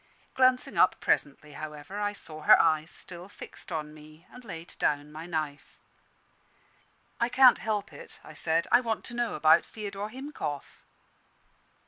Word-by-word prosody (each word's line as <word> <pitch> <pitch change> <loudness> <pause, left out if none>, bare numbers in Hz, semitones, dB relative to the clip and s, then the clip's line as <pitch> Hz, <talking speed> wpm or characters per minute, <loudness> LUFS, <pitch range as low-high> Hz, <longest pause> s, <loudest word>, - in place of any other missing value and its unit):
Glancing 255 -1 +2
up - - +4
presently, 150 +1 -1
however, 150 +6 -8
I 205 0 0
saw 155 -6 -10
her - - +7
eyes 155 0 +2
still 180 +2 -3
fixed - - -12
on 150 -2 -4
me, 155 +2 -16
and 250 - -13
laid 170 -6 -9
down 145 0 0
my 160 +2 -8
knife. 155 -4 -4 1.4
"I 235 - +1
can't 255 0 +6
help 205 -2 -3
it," - - -11
I 155 - -12
said, 160 +2 0
"I 240 - +6
want 225 -3 -2
to - - -5
know 240 -1 -1
about 155 +1 +5
Feodor 205 -1 -6
Himkoff." 255 - -6
170 Hz, 150 wpm, -28 LUFS, 155-220 Hz, 1.4 s, her